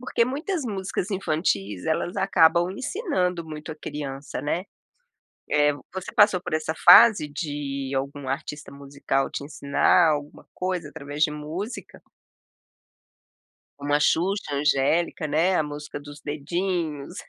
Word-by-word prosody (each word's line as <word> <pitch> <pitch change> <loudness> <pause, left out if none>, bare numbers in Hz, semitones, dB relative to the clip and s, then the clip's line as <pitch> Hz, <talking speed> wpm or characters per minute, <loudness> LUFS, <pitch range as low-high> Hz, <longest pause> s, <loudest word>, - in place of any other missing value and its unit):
Porque 250 -2 0
muitas 295 +5 -3
músicas 195 -3 -3
infantis 155 - -1
elas 160 +2 -1
acabam 175 -1 +4
ensinando 190 - -2
muito 155 0 -7
a - - -10
criança, 145 -3 -6
né, 170 +5 -1 0.8
eh. 145 0 +3 0.2
Você 190 -1 -6
passou 205 -4 +5
por - - -6
essa 155 0 -1
fase 180 -1 +8
de 145 -3 -4
algum 140 0 -4
artista 150 +2 -5
musical 140 -1 -2
te 140 - -5
ensinar 150 +3 +3
alguma 145 0 -4
coisa 180 -5 -3
através 145 +2 -5
de 150 - +4
música? 165 +10 -6 1.8
Uma 145 +1 +1
Xuxa, 170 -2 +1
angélica 150 +4 +1
né, 165 +5 +2
a 155 - +2
música 150 0 -7
dos 145 0 -11
dedinhos. 160 +1 -3
155 Hz, 125 wpm, -25 LUFS, 145-180 Hz, 1.8 s, fase